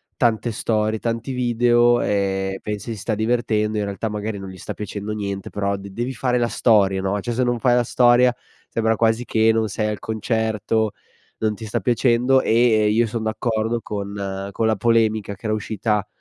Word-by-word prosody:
tante 120 -1 +1
storie, 110 0 0
tanti 115 +3 -3
video 120 -1 +3
e 95 -1 -1
pensi 105 +2 -5
si - - -8
sta 110 +2 -2
divertendo, 110 -1 0
in - - 0
realtà 100 +2 -3
magari 105 0 -4
non 95 -1 -7
gli 95 - -10
sta - - -6
piacendo 105 0 -5
niente 100 -2 -4
però 100 -1 -1
de 100 0 -9
devi 120 +6 -3
fare 125 +1 0
la 120 -1 +1
storia, 100 -4 +3
no; 95 +2 -1
cioè 120 +4 -3
se 125 +2 +1
non 120 0 +1
fai 125 -1 +3
la 125 - +3
storia 120 +1 +4 0.4
sembra 115 0 +1
quasi 115 +2 +1
che 110 0 +3
non 110 -1 +1
sei 105 +2 -1
al 105 -1 -2
concerto, 110 -1 -1 0.5
non 110 -1 0
ti 110 - -8
sta 110 +2 -2
piacendo 125 +4 +3
e - - -3
e 110 -2 +4
io 115 +2 +2
son 110 +1 -4
d'accordo 110 +1 -1
con 100 -1 -5
con 110 +3 0
la 110 - +2
polemica 110 -1 +1
che 110 - -15
era 110 - +1
uscita 105 0 -1
110 Hz, 195 wpm, -22 LUFS, 105-120 Hz, 0.5 s, storia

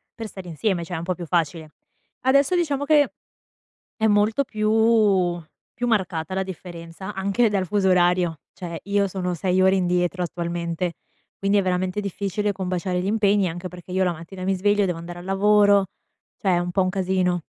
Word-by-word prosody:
per 225 -1 -6
stare 190 -3 -10
insieme, 175 +1 -1
cioè 175 - -5
è - - -2
un 165 - -5
po' 185 +1 -2
più 175 - -7
facile. 160 -2 -1 0.5
Adesso 275 +6 +3
diciamo 290 -5 0
che 295 -2 +4 0.9
è 220 - +1
molto 210 +5 +3
più 215 -5 +2 0.3
più 245 0 -2
marcata 185 -6 -1
la 190 - 0
differenza 175 +1 -8
anche 200 +5 +2
dal 195 -2 0
fuso 195 +1 +1
orario, 175 -3 +2
cioè 170 -2 -6
io 200 0 +1
sono 180 -1 -3
6 185 +2 +1
ore 190 +1 +5
indietro 180 0 0
attualmente, 170 0 -3 0.4
quindi 200 +1 +1
è - - +3
veramente 185 +2 -1
difficile 200 +1 -2
combaciare 180 -1 -2
gli 185 - -4
impegni, 205 -2 +2
anche 175 +2 -6
perché 180 0 -11
io 190 +1 +1
la 180 - +1
mattina 170 +3 -9
mi 195 0 +1
sveglio, 205 +2 +2
devo 180 -3 -2
andare 175 +1 -8
al 175 - -10
lavoro, 200 +1 +4 0.6
cioè 195 - +1
è - - +2
un 175 0 -2
po' 190 +1 +2
un 185 - 0
casino. 185 -2 0
185 Hz, 185 wpm, -23 LUFS, 175-205 Hz, 0.9 s, ore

